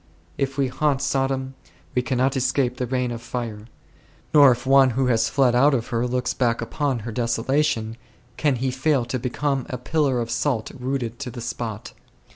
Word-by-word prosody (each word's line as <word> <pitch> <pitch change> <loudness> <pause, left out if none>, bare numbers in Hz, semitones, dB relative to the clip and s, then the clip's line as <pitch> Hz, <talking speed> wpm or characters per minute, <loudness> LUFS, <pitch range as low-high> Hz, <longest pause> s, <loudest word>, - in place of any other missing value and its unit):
If 135 0 -2
we 135 -1 +2
haunt 140 +1 0
Sodom, 135 -1 -1 0.4
we 125 - +2
cannot 130 +2 0
escape 130 -1 0
the 125 - -2
rain 125 0 -1
of 115 -1 -5
fire; 115 -3 -5 0.7
nor 145 -3 +8
if 120 +1 -2
one 135 0 +6
who 135 - +2
has 115 -2 +2
fled 135 -3 +3
out 135 +3 +4
of 115 -3 -3
her 120 +1 0
looks 125 +1 -1
back 120 -2 +1
upon 130 +1 -2
her 115 - -4
desolation, 120 0 0 0.4
can 140 +1 +1
he 130 +2 -1
fail 130 -1 +1
to 125 +2 -3
become 135 +2 -2
a 125 - -3
pillar 135 0 0
of 115 -1 -3
salt 115 -1 -1
rooted 125 -3 -4
to 140 -3 -4
the 120 - -8
spot. 115 -2 -5
125 Hz, 185 wpm, -23 LUFS, 120-135 Hz, 0.7 s, nor